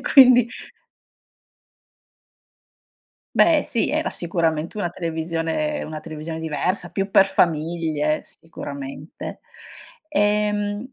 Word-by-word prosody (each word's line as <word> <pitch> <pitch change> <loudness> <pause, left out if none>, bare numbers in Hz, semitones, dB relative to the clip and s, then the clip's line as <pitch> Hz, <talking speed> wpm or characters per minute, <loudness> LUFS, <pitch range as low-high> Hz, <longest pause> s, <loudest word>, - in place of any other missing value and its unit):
E - - -13
quindi 250 -4 +7 2.9
Beh, 320 -3 +5
sì 235 -5 0
era 310 +3 0
sicuramente 170 +1 -1
una 175 - 0
televisione 165 - -2
una 155 0 -6
televisione 160 +1 -6
diversa, 160 +4 -1
più 195 0 -2
per 195 - +6
famiglie 160 -3 0
sicuramente. 140 -1 -8 0.7
Ehm, 210 -1 0
170 Hz, 90 wpm, -22 LUFS, 160-210 Hz, 2.9 s, quindi